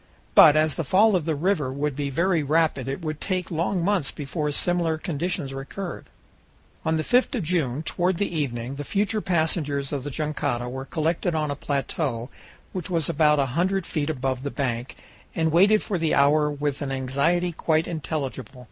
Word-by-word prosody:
But 150 - +8
as 155 -1 +3
the 165 - -2
fall 200 +8 +4
of 170 -5 0
the 160 -2 0
river 150 -4 0
would 145 +1 -2
be 145 0 -2
very 170 +4 +1
rapid 150 -3 +1
it 135 +5 -3
would 155 -1 -4
take 185 -2 -2
long 170 +2 0
months 195 -8 +1
before 150 +1 -3
similar 170 +1 +2
conditions 155 -4 -3
recurred. 165 +7 -6 0.8
On 160 0 +1
the 155 - -1
5th 250 +6 +2
of 220 - -1
June, 155 -5 0
toward 175 +2 0
the 200 -3 -2
evening, 130 -3 -3
the 145 - -4
future 210 +6 0
passengers 155 -6 0
of 140 -3 -3
the 145 - -4
jangada 145 -5 -2
were 130 +2 -5
collected 165 +3 -1
on 155 -2 0
a - - -2
plateau 135 -3 -2 0.4
which 185 -2 -4
was 165 -4 0
about 150 -1 +3
a 140 - +3
hundred 190 +3 +1
feet 150 -1 -2
above 130 -3 -2
the 140 - -3
bank, 125 -3 -3 0.4
and 160 -1 +1
waited 200 +6 +5
for 190 -4 -2
the 160 -1 +1
hour 150 +2 +4
with 145 0 -3
an 140 -2 -3
anxiety 140 +7 0
quite 160 0 +1
intelligible. 140 -6 -4
155 Hz, 185 wpm, -25 LUFS, 140-175 Hz, 0.8 s, But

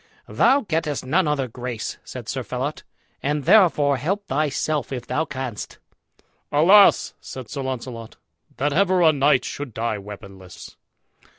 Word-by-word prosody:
"Thou 275 +2 +3
gettest 160 - -2
none 165 +6 +2
other 140 -3 0
grace," 120 -1 -6
said - - -9
Sir - - -3
Phelot, - - -4 0.4
"and 145 +1 -1
therefore 165 -7 +4
help 195 +9 -2
thyself 150 +1 -1
if 125 -3 -5
thou 160 - -1
canst." 130 -7 -6 0.7
"Alas!" 190 +8 +5
said 130 -4 -9
Sir 140 - -4
Launcelot, 125 -3 -6 0.4
"that 145 +1 0
ever 185 +1 +3
a 160 -1 +6
knight 140 -2 +3
should 140 -6 -6
die 110 -2 -2
weaponless!" 95 -2 -11
140 Hz, 135 wpm, -22 LUFS, 125-160 Hz, 0.7 s, a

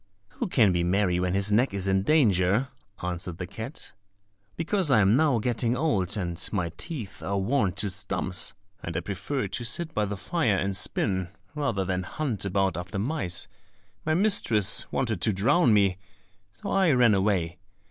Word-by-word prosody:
"Who 240 - -4
can 115 - +4
be 85 -1 +1
merry 90 0 +1
when 90 +1 0
his 100 +1 +2
neck 115 +1 +2
is 100 -1 -3
in 95 0 +2
danger?" 105 - +3 0.3
answered 90 -1 -4
the 90 - -4
cat. 110 - -8 0.6
"Because 175 +1 0
I 125 -5 +5
am 100 +2 +4
now 140 -3 +3
getting 120 +1 0
old, 110 - +1
and 90 -2 -2
my 90 -5 -1
teeth 125 - -6
are 100 0 -2
worn 100 -1 +1
to 105 - +2
stumps, 95 -1 -2 0.3
and 85 -1 -4
I - - -1
prefer 100 +7 -3
to 120 - -4
sit 160 +7 -2
by 105 - +1
the 100 0 -4
fire 120 - 0
and 100 0 -1
spin, 95 -2 -1 0.3
rather 135 -11 -1
than 90 0 -1
hunt 110 - -3
about 95 -3 0
after 90 +2 -5
mice, 100 - -1 0.6
my 155 0 +1
mistress 115 - +2
wanted 115 -8 -1
to 110 - +2
drown 125 - +3
me, 100 -3 +3 0.5
so 200 - -7
I 190 -3 +3
ran 120 -4 +5
away. 95 -4 0
100 Hz, 175 wpm, -27 LUFS, 95-130 Hz, 0.6 s, I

